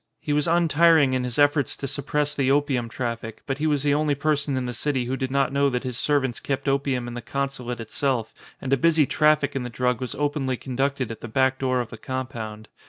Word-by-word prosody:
He 150 - -2
was 150 -1 +1
un 170 0 +3
tiring 160 -3 +5
in 130 -1 0
his 125 -1 -3
efforts 145 -1 +2
to - - -5
suppress 145 +2 -1
the 135 -3 +1
opium 135 -4 +1
traffic, 115 -2 -5
but 135 0 -3
he 155 - +1
was 145 -2 +1
the 145 -1 +3
only 150 0 +1
person 145 -1 0
in 130 - -2
the 125 - -3
city 130 0 -1
who 130 +2 -2
did 130 -1 -2
not 135 0 +1
know 140 0 +3
that 125 -1 -2
his 125 -2 -3
servants 135 -2 0
kept 135 +1 -3
opium 135 -3 0
in 120 - -6
the 120 - -5
consulate 135 -3 -3
itself, 120 0 -1 0.3
and 135 0 -1
a - - +4
busy 160 +2 +4
traffic 150 -1 +2
in 135 - -1
the 125 - -4
drug 125 0 -1
was 130 - -4
openly 145 -3 -1
conducted 135 -1 -2
at 115 - -8
the - - -6
back 130 +3 +1
door 130 -1 +1
of 120 - -7
the - - -9
compound. 115 -5 -5
135 Hz, 240 wpm, -24 LUFS, 125-145 Hz, 0.3 s, tiring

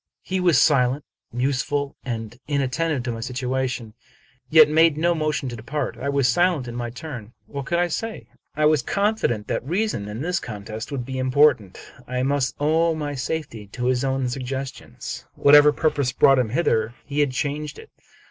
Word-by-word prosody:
He 190 0 -2
was 175 -3 +4
silent, 135 -1 +3 0.3
museful, 140 +3 -1
and 115 -3 -5
inattentive 145 0 0
to 120 - -2
my 115 - -5
situation, 125 -2 -3 0.6
yet 155 -1 +8
made 160 0 +4
no 170 +2 +2
motion 155 -4 -1
to 120 - -6
depart. 120 +7 -4
I 140 - -3
was 140 -2 +2
silent 165 0 +2
in 120 - -6
my 120 -1 -3
turn. 125 -4 -8
What 140 -2 -6
could 170 - +1
I 175 0 +2
say? 225 +6 -4 0.3
I 155 +1 +2
was 155 0 +4
confident 200 - 0
that - - -2
reason 175 - -1
in 105 +2 -6
this 175 +2 0
con 105 -4 -8
test 110 +5 -6
would 130 -4 -3
be 130 0 -4
impotent. 130 -6 +3 0.3
I 125 0 -1
must 140 -1 0
owe 160 +3 +2
my 145 -2 -3
safety 130 -6 -4
to 125 - -3
his 125 0 +1
own 135 -1 0
suggestions. 130 +1 -6
Whatever 145 +1 +7
purpose 145 -4 0
brought 135 +1 +5
him 120 -3 0
hither, 115 -5 0
he 145 +1 -3
had 145 -1 +3
changed 145 +2 -3
it. - - -13
140 Hz, 180 wpm, -23 LUFS, 125-155 Hz, 0.6 s, yet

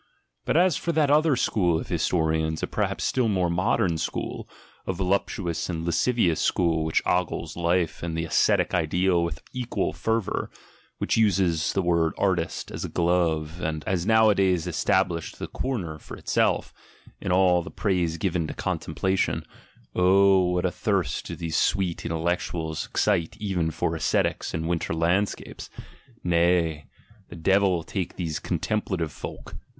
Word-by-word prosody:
But - - +1
,s 180 -2 +4
for 170 - -1
that 150 -3 +3
other 155 -1 +4
school 90 -9 +1
of - - -7
historians 80 -2 0
a - - +3
perhaps - - -2
still 125 -3 +1
more 90 -5 +1
modern" 85 -1 +1
school, - - -4 0.4
a 95 - 0
voluptuous 90 -2 -1
and 85 -2 -3
lascivious 85 0 +2
school 80 -3 +1
which 80 0 +1
•gles 85 -2 -1
life 85 -1 0
and 85 -1 -3
the 80 - -1
ascetic - - +2
ideal 90 +1 +2
with 85 -3 -4
equal 125 -1 -2
fervour, 115 -3 -1 0.5
which - - 0
ises 95 -7 +2
the 95 - 0
word 85 -2 +2
"artist" 90 -4 -1
as - - -5
a - - -4
glove, 85 -2 0
and 80 -1 -2
has 90 -3 -1
nowadays 100 -5 +3
es - - -2
ablished 85 -2 0
a - - -3
"corner" 90 -13 -3
for - - -10
itself, - - 0 0.5
in - - -3
all 90 -1 +4
the - - -8
praise 90 -6 0
given 85 -2 -1
to - - -6
:ontemplation; 95 +5 -1 0.5
oh, 95 +1 +5
what 90 0 0
a 90 - +1
thirst 95 - -1
do - - -5
these 85 -2 -4
sweet 90 -4 +1
intellec 85 +2 -1
uals 80 -2 -4
excite 100 -1 0
even 95 -6 -1
for 80 - -2
ascetics - - 0
and 80 +1 -3
winter 85 -1 -1
landscapes! 90 +5 -1 0.5
Nay! 85 -3 +2 0.4
rhe 85 - -8
devil 95 -3 +3
take 95 -1 -4
these 80 -4 -3
"contemplative" 95 -7 -2
folk! - - -8
90 Hz, 155 wpm, -25 LUFS, 80-95 Hz, 0.5 s, oh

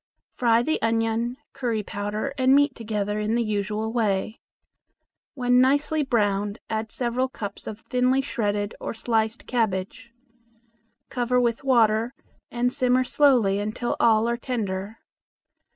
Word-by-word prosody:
Fry 235 -1 +3
the 315 +5 -1
onion, 225 +2 0 0.2
curry 235 -6 -2
powder, 205 +7 -4
and 260 0 +4
meat 285 -1 +4
together 210 -2 -3
in 215 +2 0
the 235 - +1
usual 215 +1 -2
way. 215 -2 0 1.0
When 250 -1 +3
nicely 290 +4 +2
browned, 205 -5 0
add 220 0 -2
several 250 +1 -1
cups 205 -5 -7
of 215 +1 -7
thinly 255 +2 +1
shredded 205 -5 -2
or - - -4
sliced 225 0 -1
cabbage. 225 0 -2 1.0
Cover 250 0 +1
with 235 +1 0
water 230 -1 +3 0.3
and 245 +1 -1
simmer 255 0 +2
slowly 245 -8 +3
until 215 +4 -2
all 225 -1 +4
are 235 0 0
tender. 215 -4 -4
230 Hz, 130 wpm, -25 LUFS, 215-250 Hz, 1.0 s, and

